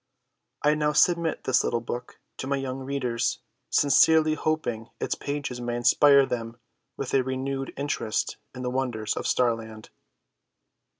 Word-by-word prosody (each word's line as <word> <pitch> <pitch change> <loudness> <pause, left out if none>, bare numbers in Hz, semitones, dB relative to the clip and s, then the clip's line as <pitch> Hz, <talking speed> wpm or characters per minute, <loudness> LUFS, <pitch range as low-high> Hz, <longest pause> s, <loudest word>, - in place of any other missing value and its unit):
I 150 +1 +4
now 150 0 0
submit 170 +1 +2
this 130 - +2
little 120 - 0
book 120 +1 -7 0.2
to 130 - -5
my 140 - +1
young 135 -1 -4
readers, 130 -4 -2 0.3
sincerely 155 +2 +4
hoping 130 -8 -2
its - - -1
pages 140 -4 -4
may 120 0 -2
inspire 140 +3 +5
them 115 -2 -4 0.4
with 135 - -4
a 135 - +4
renewed 135 +1 -3
interest 140 -6 -2 0.2
in 125 - -6
the 125 - -2
wonders 120 -5 -2
of - - -3
Starland. 115 -3 -1
130 Hz, 140 wpm, -26 LUFS, 120-145 Hz, 0.4 s, inspire